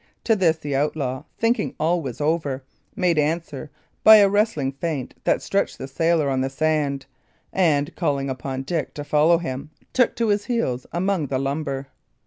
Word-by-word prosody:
To 225 - +3
this 170 -5 +2
the 145 -3 -4
outlaw, 135 -2 -1
thinking 230 +1 0
all 170 +2 +1
was 130 -6 -6
over, 145 -3 -1 0.3
made 175 -4 +2
answer 150 -1 -2 0.3
by 220 - +10
a 205 -2 +7
wrestling 195 -9 +1
feint 140 -1 -4
that - - +2
stretched - - -1
the 135 - -6
sailor 165 +2 +1
on 135 -1 0
the 135 - -1
sand, 145 -1 0 0.5
and, 150 -6 +1
calling 140 -1 0
upon 130 0 -4
Dick 160 0 -3
to 145 - -5
follow 155 +3 +4
him, 140 -3 -5 0.2
took 250 -2 +3
to 230 -2 0
his 205 0 +1
heels 130 - -1
among 175 -2 0
the 130 - -1
lumber. 135 0 -3
150 Hz, 170 wpm, -23 LUFS, 135-170 Hz, 0.5 s, by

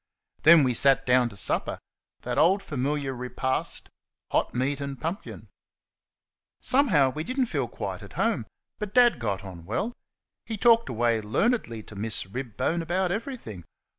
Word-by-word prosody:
Then 165 -1 +8
we 125 -2 +2
sat 135 +2 +4
down 125 -1 +3
to 100 - -9
supper - - +1 0.4
that - - -2
old 190 +5 +4
familiar 140 -1 -2
repast, 125 +1 -3 0.4
hot - - 0
meat 135 +3 -1
and 140 -2 -5
pumpkin. 165 - -5 1.1
Somehow 180 - +3
we 155 +3 -4
did 255 +9 -4
n't 250 -3 +2
feel - - -1
quite - - -5
at - - -12
home; - - 0 0.3
but 210 -1 -5
Dad 245 - +5
got 105 -4 -2
on 90 -4 -9
well. 230 - -2 0.5
He 225 -2 -5
talked 230 +1 +4
away 115 -1 +1
learnedly 115 - 0
to 105 - -13
Miss 105 0 -2
Ribbone 125 - -2
about 175 +2 0
everything. 205 - -5
140 Hz, 155 wpm, -26 LUFS, 120-195 Hz, 1.1 s, Then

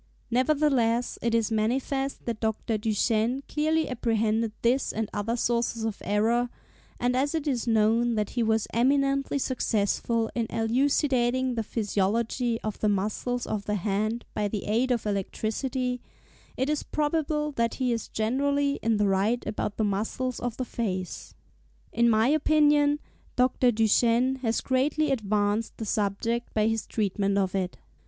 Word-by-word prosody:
Nevertheless, 250 -3 +2
it 230 0 +1
is 230 -1 +1
manifest 265 +5 -1
that 230 -2 -3
Dr. 220 0 -1
Duchenne 225 +4 +1
clearly 315 +1 +1
apprehended 225 -2 0
this 245 +3 +2
and 220 0 -2
other 220 +3 -1
sources 235 -1 0
of 220 -2 -3
error, 230 +4 +1 0.5
and 245 +1 +1
as 285 +5 +1
it 315 -2 -2
is 250 -4 -1
known 225 +1 +3
that 210 -1 -1
he 245 - -1
was 220 -1 +2
eminently 275 +3 +2
successful 230 -3 0
in 230 -2 -1
elucidating 255 +1 +1
the 230 - -1
physiology 225 +3 -1
of 215 -1 -4
the 215 - +2
muscles 215 +5 -1
of 205 -2 -3
the 210 - -1
hand 215 +4 -1
by 210 -1 0
the 205 0 -3
aid 235 +5 +1
of 240 -3 0
electricity, 245 +5 -2 0.6
it 260 - 0
is 300 0 0
probable 300 0 -1
that 230 -4 -1
he 255 -2 0
is 230 - -3
generally 280 +5 0
in 225 -1 +1
the 205 -1 +2
right 200 +5 +1
about 210 -1 -3
the 220 - +1
muscles 220 +5 -2
of 245 -2 -4
the 255 - -2
face. 185 -7 -4 0.6
In 235 0 +3
my 220 +1 +4
opinion, 295 0 +4 0.4
Dr. 250 0 +3
Duchenne 235 +3 +3
has 230 -3 -1
greatly 280 +3 +1
advanced 210 -2 0
the 220 - -4
subject 220 +3 -1
by 215 -1 +3
his 225 0 -1
treatment 200 -2 0
of 190 -2 +1
it. 190 -2 -2
230 Hz, 150 wpm, -27 LUFS, 215-260 Hz, 0.6 s, my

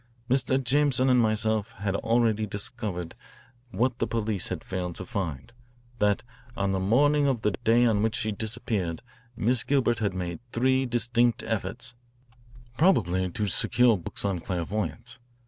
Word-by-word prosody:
"Mr. 130 0 +3
Jameson 135 0 +3
and 125 - +5
myself 110 -2 +1
had 100 0 -3
already 115 -2 +1
discovered 100 -4 -3 0.6
what 120 +3 0
the - - 0
police 110 -4 -1
had - - -5
failed 90 -2 -4
to - - -6
find, 95 - -4 0.5
that 105 -1 +2 0.3
on 100 -1 0
the 95 - 0
morning 140 +9 +3
of 125 -5 0
the 105 - +2
day 120 +3 +3
on 110 -3 +2
which 110 0 +1
she 110 - -1
disappeared 105 -4 -3 0.3
Miss 120 +3 +1
Gilbert 120 -5 +1
had 100 -4 -1
made 90 -2 -4
three 130 +2 +2
distinct 120 0 +1
efforts, - - -3 0.9
probably, 95 - +3
to 105 +4 -2
secure 120 +4 +3
books 90 +2 -6
on 95 -3 0
clairvoyance. 100 - -4
110 Hz, 145 wpm, -27 LUFS, 100-120 Hz, 0.9 s, and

